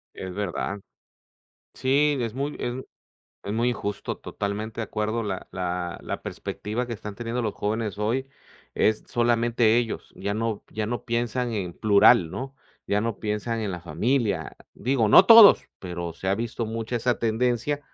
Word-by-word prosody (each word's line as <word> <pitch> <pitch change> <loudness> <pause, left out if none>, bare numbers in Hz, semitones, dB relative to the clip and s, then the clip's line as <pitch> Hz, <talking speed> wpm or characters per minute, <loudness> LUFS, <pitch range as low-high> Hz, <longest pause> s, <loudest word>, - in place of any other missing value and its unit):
Es 95 -1 -6
verdad. 100 0 -3 1.0
Sí, 145 +3 +2
es 115 -1 -3
muy 140 +2 -3
es 120 - -3 0.7
es 100 - -3
muy 120 +2 +1
injusto 105 -3 -4
totalmente 105 +3 -4
de - - -1
acuerdo 110 +2 -2
la 95 -4 -4
la 90 -1 -3
la - - -5
perspectiva 110 +4 -4
que 120 - -5
están 105 -2 -7
teniendo 120 +2 -3
los 110 -3 -2
jóvenes 105 -1 -2
hoy 115 +6 0 0.5
es 110 0 +1
solamente 120 -1 +2
ellos. 120 -2 -2
Ya 100 0 -3
no 110 -1 -2
ya 110 -1 -3
no 120 +2 -4
piensan 120 +1 -1
en 95 -5 -3
plural, 100 -4 +5
¿no?, 135 +6 -6 0.3
ya 100 +1 +1
no 115 -1 -2
piensan 110 +2 -2
en 105 -2 -2
la 90 -1 -5
familia. 105 - -1 0.2
Digo, 125 -4 +1
no 185 - +8
todos, 225 -2 +9
pero 85 -2 -5
se 95 - -5
ha 95 - +3
visto 115 +1 -3
mucha 115 +2 -3
esa 120 +1 0
tendencia 120 +5 0
110 Hz, 165 wpm, -25 LUFS, 100-120 Hz, 1.0 s, todos